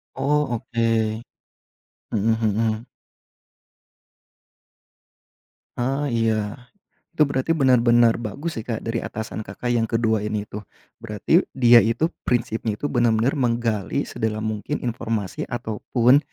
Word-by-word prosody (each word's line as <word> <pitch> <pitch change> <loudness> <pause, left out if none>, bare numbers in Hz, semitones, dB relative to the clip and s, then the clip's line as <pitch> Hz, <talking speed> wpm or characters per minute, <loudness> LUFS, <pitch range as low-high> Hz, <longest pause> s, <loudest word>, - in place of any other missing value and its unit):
Oh 150 +1 +1
oke. 115 -2 0 0.9
Mhm 110 +1 +1
mhm. 110 +1 0 2.9
Ah 135 +4 -1
iya. 110 -2 0 0.6
Itu 155 - +4
berarti 140 +2 +1
benar-benar 120 -5 +4
bagus 120 +6 -5
ya 110 - -6
Kak 115 -2 -3
dari 115 +1 -2
atasan 110 -1 -5
Kakak 120 +5 -4
yang 115 -2 +2
ke-2 110 -2 0
ini 105 -1 -2
tuh. 105 -1 -9 0.3
Berarti 115 - +1
dia 120 -2 +7
itu 115 +9 +2 0.2
prinsipnya 115 -2 0
itu 145 +7 -4
benar-benar 120 +2 +2
menggali 115 -5 0
sedalam 110 -1 -3
mungkin 110 +6 -3
informasi 115 -5 -3
ataupun 120 +2 +2
115 Hz, 110 wpm, -23 LUFS, 110-125 Hz, 2.9 s, dia